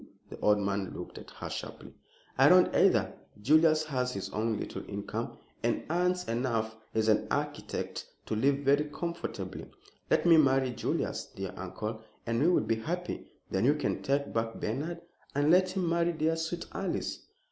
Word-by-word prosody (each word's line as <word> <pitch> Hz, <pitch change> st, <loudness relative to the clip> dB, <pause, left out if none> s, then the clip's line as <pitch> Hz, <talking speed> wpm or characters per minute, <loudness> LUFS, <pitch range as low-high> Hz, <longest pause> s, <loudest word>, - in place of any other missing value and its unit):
The -, -, -8 dB
old 105 Hz, 0 st, +4 dB
man 100 Hz, -1 st, -2 dB
looked -, -, -7 dB
at -, -, -12 dB
her -, -, -7 dB
sharply. -, -, -7 dB, 0.4 s
"I -, -, +6 dB
don't -, -, +6 dB
either. -, -, +4 dB, 0.3 s
Julius 155 Hz, +6 st, +5 dB
has 130 Hz, -4 st, -1 dB
his 100 Hz, -5 st, -5 dB
own 110 Hz, 0 st, -1 dB
little -, -, -5 dB
income, 100 Hz, 0 st, -4 dB, 0.2 s
and -, -, 0 dB
earns 180 Hz, +1 st, +1 dB
enough 115 Hz, -2 st, -1 dB, 0.2 s
as 110 Hz, 0 st, +2 dB
an 110 Hz, -, +3 dB
architect -, -, -3 dB, 0.2 s
to 110 Hz, -, -2 dB
live 135 Hz, +6 st, +3 dB
very 140 Hz, +2 st, +4 dB
comfortably. 170 Hz, +3 st, -5 dB, 0.4 s
Let -, -, +3 dB
me 170 Hz, -2 st, +7 dB
marry 135 Hz, -3 st, +4 dB
Julius, 120 Hz, -, -2 dB
dear 95 Hz, -1 st, -5 dB
uncle, 105 Hz, +4 st, -5 dB, 0.2 s
and 115 Hz, +1 st, 0 dB
we 155 Hz, -, +4 dB
will 180 Hz, -, +4 dB
be 110 Hz, +1 st, 0 dB
happy. 175 Hz, +9 st, -4 dB, 0.2 s
Then 95 Hz, -, +1 dB
you 145 Hz, +5 st, +5 dB
can 150 Hz, -3 st, -1 dB
take 140 Hz, +1 st, 0 dB
back 115 Hz, 0 st, -1 dB
Bernard 155 Hz, +10 st, -3 dB, 0.3 s
and 145 Hz, +2 st, +3 dB
let 185 Hz, +1 st, +5 dB
him 185 Hz, -1 st, -1 dB
marry 170 Hz, +1 st, +2 dB
dear, 160 Hz, +1 st, +1 dB
sweet 165 Hz, +1 st, -3 dB
Alice." 195 Hz, -1 st, -2 dB
140 Hz, 170 wpm, -30 LUFS, 110-165 Hz, 0.4 s, me